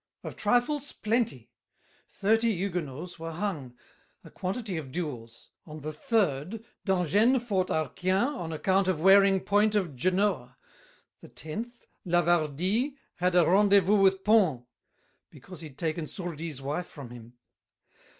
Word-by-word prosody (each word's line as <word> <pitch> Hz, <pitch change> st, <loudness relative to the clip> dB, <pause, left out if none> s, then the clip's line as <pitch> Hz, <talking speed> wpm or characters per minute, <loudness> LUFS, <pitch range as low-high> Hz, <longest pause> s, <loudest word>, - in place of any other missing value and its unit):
Of -, -, -7 dB
trifles, 280 Hz, +4 st, 0 dB
plenty—thirty 220 Hz, -, -2 dB
Huguenots 175 Hz, -3 st, -4 dB
Were 165 Hz, 0 st, -6 dB
hung; 155 Hz, -9 st, -4 dB, 0.5 s
a -, -, -14 dB
quantity 195 Hz, +1 st, -4 dB
of 140 Hz, -5 st, -6 dB
duels. 125 Hz, -9 st, -6 dB, 0.2 s
On 155 Hz, 0 st, -9 dB
The 155 Hz, +2 st, -5 dB
third, 195 Hz, -, -1 dB, 0.2 s
D'Angennes 200 Hz, -, +3 dB
fought 190 Hz, -4 st, +1 dB
Arquien 185 Hz, -, 0 dB
on 165 Hz, -10 st, -5 dB
account 190 Hz, +4 st, +1 dB
Of 185 Hz, -5 st, 0 dB
wearing 195 Hz, +2 st, +5 dB
point 210 Hz, +2 st, +2 dB
of 180 Hz, -9 st, -1 dB
Genoa; 180 Hz, -, 0 dB, 0.6 s
the -, -, -14 dB
tenth, 230 Hz, +10 st, -7 dB, 0.2 s
Lavardie 175 Hz, -, +1 dB, 0.2 s
had 180 Hz, 0 st, +1 dB
a 175 Hz, -2 st, +6 dB
rendezvous 200 Hz, +2 st, +4 dB
with 190 Hz, 0 st, +3 dB
Pons, 190 Hz, -, +3 dB, 0.7 s
Because 155 Hz, +5 st, -12 dB
he'd 150 Hz, -5 st, -10 dB
taken 160 Hz, -1 st, -2 dB
Sourdis' 165 Hz, -5 st, -6 dB
wife 150 Hz, +6 st, -3 dB
from 135 Hz, -5 st, -10 dB
him. 120 Hz, -1 st, -12 dB
180 Hz, 125 wpm, -28 LUFS, 155-205 Hz, 0.7 s, a